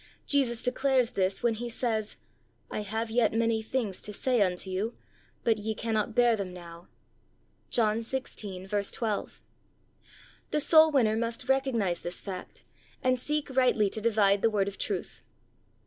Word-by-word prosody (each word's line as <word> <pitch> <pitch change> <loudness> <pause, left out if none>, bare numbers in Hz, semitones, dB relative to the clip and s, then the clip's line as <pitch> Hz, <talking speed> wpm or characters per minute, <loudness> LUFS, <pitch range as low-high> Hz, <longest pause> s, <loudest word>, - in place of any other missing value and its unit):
Jesus 250 -5 +1
declares 260 -1 +2
this 190 +3 0
when 235 -1 +3
He 240 +2 -5
says, 225 -2 -1 0.5
"I - - -2
have 220 +2 -3
yet 230 -2 +2
many 225 -1 +2
things 220 -4 -3
to 210 - -6
say 245 +2 +1
unto 185 -1 0
you, 195 +5 -3 0.5
but 225 -2 +2
ye 220 +1 -3
cannot 220 -1 -1
bear 240 -1 +5
them 195 -3 -4
now." 170 -1 -11 0.8
(John 220 -2 +2
i6: 205 -5 -3
12.) 220 -3 -3 1.1
The 300 - 0
soul 315 +1 +7
winner 230 -7 +3
must 230 +2 -3
recognize 245 -10 +1
this 175 +1 -5
fact, 185 -2 -7 0.4
and 255 0 +2
seek 300 +1 -2
rightly 245 -6 +3
to 220 - -3
divide 205 -3 +3
the 225 - +4
word 200 -2 +1
of 200 - -6
truth. - - -4
225 Hz, 150 wpm, -29 LUFS, 200-245 Hz, 1.1 s, soul